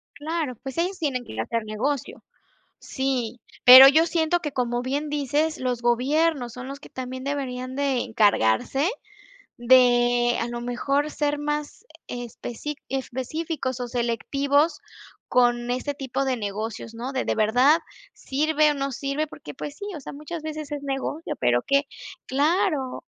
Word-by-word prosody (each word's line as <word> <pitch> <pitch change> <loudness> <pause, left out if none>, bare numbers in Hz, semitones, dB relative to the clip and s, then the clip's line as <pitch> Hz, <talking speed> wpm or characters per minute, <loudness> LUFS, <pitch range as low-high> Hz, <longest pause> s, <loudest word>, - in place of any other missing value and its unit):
Claro, 305 -3 -3
pues, 270 +3 -7
ellos 365 +3 -1
tienen 265 -6 -1
que 110 - -8
hacer 230 - -1
negocio. 245 +6 -3 0.6
Sí, 250 -3 -2 0.2
pero 260 +2 +12
yo 315 +4 +5
siento 330 +1 +1
que, 295 - -3
como 245 -1 -1
bien 285 +4 -2
dices, 295 +2 0
los 250 -2 -2
gobiernos 255 +2 +1
son 255 +1 -8
los 280 +1 -7
que - - -14
también 260 0 -6
deberían 260 -2 -4
de 275 -3 0
encargarse 220 - +2 0.7
de, 240 -1 +4
a 230 - -2
lo 240 0 -5
mejor, 275 +5 -1
ser 295 -1 -1
más 295 +7 -4 0.2
especí 245 +4 -6
específicos 265 +1 -3
o 245 - -3
selectivos 280 +6 0 0.5
con 240 -1 +2
este 270 +3 -2
tipo 270 0 -3
de 260 -2 0
negocios, 215 +2 -5
¿no?, 250 +4 -5
de 260 - -1
de - - 0
verdad, 250 +9 +4 0.4
sirve 305 +2 +1
o - - 0
no 275 0 -2
sirve, 275 +4 -2
porque, 300 - -10
pues, 285 +2 -7
sí, 405 - -8
o - - -7
sea, - - -8
muchas 305 +3 -7
veces 310 -1 -6
es 290 -1 -4
negocio, 275 +3 -3
pero 120 -1 +2
que 280 +1 +2 0.4
claro. 290 -1 0
270 Hz, 155 wpm, -24 LUFS, 245-295 Hz, 0.7 s, pero